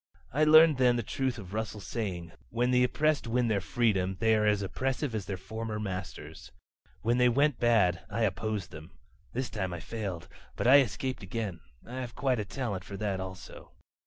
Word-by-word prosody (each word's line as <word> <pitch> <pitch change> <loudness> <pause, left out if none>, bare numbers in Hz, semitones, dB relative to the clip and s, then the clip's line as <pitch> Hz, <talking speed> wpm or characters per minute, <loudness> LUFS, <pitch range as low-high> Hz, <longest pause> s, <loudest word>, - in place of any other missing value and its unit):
"I 155 +3 +3
learned 155 -2 +7
then 125 -1 +5
the 120 - -1
truth 130 +3 -2
of 100 -3 -9
Russell's 110 -2 -4
saying: 90 -7 -4 0.2
'When 120 +2 +1
the 125 0 +4
oppressed 155 +2 +1
win 120 0 +1
their 100 -3 +1
freedom 95 -5 0
they 110 -1 +3
are 105 -1 +3
as 105 -1 +2
oppressive 135 +6 -2
as 105 -5 -3
their 95 - -3
former 110 +3 -5
masters.' 95 -2 -6 0.5
When 120 +3 +2
they 125 0 +5
went 140 +1 +2
bad, 100 -8 +3
I 115 - -1
opposed 105 -1 -2
them. 80 +4 -11 0.4
This 130 +1 -3
time 95 -5 -3
I 85 - -5
failed. 95 -2 -5 0.3
But - - -3
I 135 +3 +8
escaped 130 +1 -1
again. 100 -2 -4 0.3
I 125 +2 -7
have 125 -2 -6
quite 130 -4 +1
a 105 - -2
talent 105 -5 -4
for 100 +1 -8
that 100 -2 -2
also. 95 -1 -9
110 Hz, 190 wpm, -30 LUFS, 95-125 Hz, 0.5 s, I